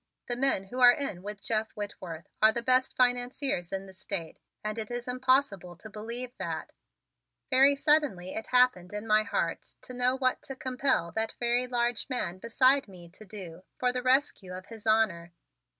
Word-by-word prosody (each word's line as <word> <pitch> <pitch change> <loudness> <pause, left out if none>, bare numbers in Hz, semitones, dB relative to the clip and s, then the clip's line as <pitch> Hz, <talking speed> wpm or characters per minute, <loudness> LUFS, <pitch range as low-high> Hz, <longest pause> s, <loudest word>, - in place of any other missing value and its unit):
The 240 - 0
men 260 -6 +1
who 255 - -5
are 245 -1 +9
in 260 - -4
with 205 0 -8
Jeff 220 -1 -1
Whitworth 185 -5 -7 0.2
are 220 0 +7
the 235 +1 -3
best 255 +1 +2
financiers 245 -6 +1
in 195 0 -4
the 190 - -13
State 190 -3 -5 0.2
and 215 +1 -3
it 215 - -3
is 240 0 -5
impossible 250 -8 +1
to 215 +5 -13
believe 235 +4 -5
that - - -5 0.4
" - - -57
Very 270 +2 +6
suddenly 280 - +1
it 220 - -5
happened 250 -8 +3
in 210 +1 -4
my 215 -1 +4
heart - - -3
to 255 - -8
know 250 +1 +1
what 255 -1 0
to 270 - -8
compel 260 -9 -1
that 220 +5 -1
very 245 +1 +2
large 240 0 -1
man 185 -8 -1
beside 255 +5 +3
me 175 -3 -13
to 205 +5 -14
do 185 -5 -8 0.2
for 250 0 +1
the 250 - -1
rescue 255 -7 +1
of 185 +1 -8
his 225 0 -11
honor. 185 -6 +1
230 Hz, 185 wpm, -29 LUFS, 195-255 Hz, 0.4 s, are